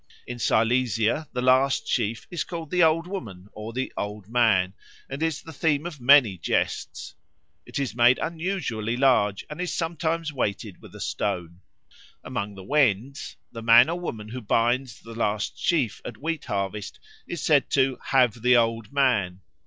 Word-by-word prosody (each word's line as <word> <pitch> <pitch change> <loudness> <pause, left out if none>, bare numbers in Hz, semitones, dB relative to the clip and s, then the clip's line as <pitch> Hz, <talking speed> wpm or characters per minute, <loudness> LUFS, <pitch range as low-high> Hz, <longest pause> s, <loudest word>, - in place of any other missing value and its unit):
In 120 0 -7
Silesia 115 +4 +1
the 125 -1 -3
last 130 +2 +3
sheaf 115 -1 -1
is 175 -4 -2
called 165 -3 -7
the 180 - +2
Old 165 +1 +4
Woman 105 - -7
or 110 +1 -7
the 130 +3 -4
Old 105 -1 -5
Man 110 -6 +2 0.3
and 135 +2 -6
is 160 -2 -1
the 160 - -10
theme 150 +1 0
of 155 -6 -7
many 120 -8 +5
jests; - - -2 0.5
it - - -6
is 135 -5 -2
made 120 +2 +5
unusually 160 - -3
large 125 -7 +2
and 155 +3 -7
is 180 - -2
sometimes 165 -1 -2
weighted 105 -6 -3
with - - -14
a - - -10
stone. 90 -3 -3 0.6
Among 100 0 -4
the 95 - -10
Wends 135 0 0 0.2
the 115 - -8
man 120 +5 +7
or 175 - -3
woman 110 -11 -6
who 125 +3 -6
binds 120 +3 0
the 115 - -11
last 105 -2 -2
sheaf 145 - 0
at - - -7
wheat 160 0 -3
harvest 100 -1 -4 0.3
is 170 -4 -5
said 145 -3 +3
to 130 -2 +1
"have 125 -4 +2
the 125 +1 +5
Old 115 -1 0
Man." 110 -10 +1
125 Hz, 170 wpm, -25 LUFS, 105-150 Hz, 0.6 s, man